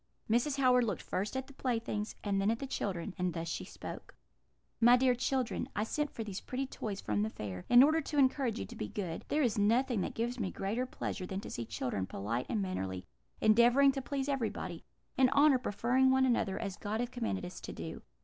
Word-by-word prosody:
Mrs. 245 Hz, +6 st, +2 dB
Howard 250 Hz, -2 st, +4 dB
looked 220 Hz, -, -3 dB
first 205 Hz, +7 st, -2 dB
at 265 Hz, -, -3 dB
the 275 Hz, -, -15 dB
playthings, 225 Hz, -5 st, -2 dB
and 200 Hz, -2 st, +1 dB
then 200 Hz, -, +2 dB
at 230 Hz, -, +1 dB
the 275 Hz, -, -5 dB
children, 195 Hz, -7 st, -3 dB
and 180 Hz, -2 st, 0 dB
thus 165 Hz, 0 st, -3 dB
she 165 Hz, -, -3 dB
spoke: -, -, -9 dB, 0.6 s
"'My 240 Hz, +2 st, +7 dB
dear 255 Hz, 0 st, +4 dB
children, 255 Hz, 0 st, -1 dB
I 210 Hz, -, +1 dB
sent 295 Hz, +6 st, -1 dB
for 230 Hz, -, -5 dB
these 200 Hz, -3 st, -5 dB
pretty 260 Hz, +2 st, -3 dB
toys 210 Hz, -6 st, -5 dB
from 205 Hz, -, -1 dB
the 215 Hz, -, 0 dB
fair, 95 Hz, -, -6 dB
in 245 Hz, +1 st, +9 dB
order 315 Hz, +3 st, +4 dB
to 295 Hz, 0 st, -4 dB
encourage 260 Hz, -3 st, +3 dB
you 95 Hz, -, -3 dB
to -, -, -11 dB
be 105 Hz, -, -4 dB
good: 170 Hz, -, -4 dB
there 300 Hz, +1 st, +1 dB
is 230 Hz, -4 st, +1 dB
nothing 230 Hz, +2 st, +2 dB
that -, -, -3 dB
gives 240 Hz, +2 st, -2 dB
me 195 Hz, -4 st, -1 dB
greater 220 Hz, +8 st, -2 dB
pleasure 185 Hz, -6 st, -4 dB
than 190 Hz, +1 st, -4 dB
to -, -, -8 dB
see 115 Hz, -, -4 dB
children 100 Hz, -5 st, -2 dB
polite 115 Hz, +5 st, -3 dB
and 215 Hz, -4 st, 0 dB
mannerly, 95 Hz, -, -3 dB, 0.4 s
endeavouring 240 Hz, +5 st, +6 dB
to 270 Hz, 0 st, -3 dB
please 275 Hz, 0 st, -3 dB
everybody, 225 Hz, -, -2 dB, 0.3 s
"in 260 Hz, -1 st, +5 dB
honour 280 Hz, -1 st, +5 dB
preferring 250 Hz, +3 st, +2 dB
one 265 Hz, 0 st, +4 dB
another," 235 Hz, -6 st, +1 dB
as 195 Hz, -1 st, -4 dB
God 215 Hz, +1 st, -3 dB
hath 245 Hz, +1 st, -2 dB
commanded 225 Hz, -7 st, -2 dB
us 180 Hz, -, -8 dB
to -, -, -6 dB
do. -, -, -7 dB
230 Hz, 220 wpm, -33 LUFS, 195-260 Hz, 0.6 s, in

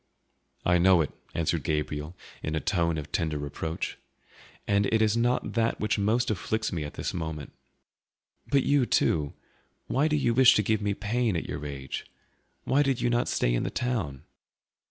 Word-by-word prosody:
"I 90 Hz, 0 st, +4 dB
know 90 Hz, -1 st, +6 dB
it," 75 Hz, -, -2 dB, 0.2 s
answered 85 Hz, -1 st, 0 dB
Gabriel 75 Hz, +2 st, -2 dB, 0.3 s
in 75 Hz, -, -2 dB
a -, -, +1 dB
tone 85 Hz, -2 st, 0 dB
of 75 Hz, -1 st, -6 dB
tender 80 Hz, -2 st, 0 dB
reproach, 75 Hz, +3 st, -4 dB, 0.7 s
"and 100 Hz, 0 st, +3 dB
it 110 Hz, -, +2 dB
is 110 Hz, 0 st, +3 dB
not 120 Hz, +2 st, +1 dB
that 115 Hz, 0 st, +1 dB
which 105 Hz, 0 st, 0 dB
most 110 Hz, +4 st, +2 dB
afflicts 110 Hz, +2 st, -2 dB
me 80 Hz, -3 st, -2 dB
at 75 Hz, -, -7 dB
this -, -, -3 dB
moment. 80 Hz, -4 st, -5 dB, 1.0 s
But 140 Hz, -1 st, +3 dB
you, 140 Hz, -3 st, +3 dB
too, 75 Hz, -3 st, +1 dB, 0.5 s
why 140 Hz, +4 st, +1 dB
do 155 Hz, -, +1 dB
you 125 Hz, -5 st, +2 dB
wish 130 Hz, +1 st, +7 dB
to 105 Hz, -, +3 dB
give 110 Hz, +1 st, +1 dB
me 100 Hz, -1 st, 0 dB
pain, 110 Hz, 0 st, 0 dB
at 85 Hz, -, -2 dB
your -, -, -5 dB
age? 70 Hz, -2 st, -6 dB, 0.6 s
Why 140 Hz, -, +3 dB
did 135 Hz, -3 st, +1 dB
you 120 Hz, -, +1 dB
not 120 Hz, 0 st, +1 dB
stay -, -, +1 dB
in -, -, +1 dB
the -, -, -1 dB
town?" 95 Hz, -, -2 dB
100 Hz, 180 wpm, -28 LUFS, 75-115 Hz, 1.0 s, wish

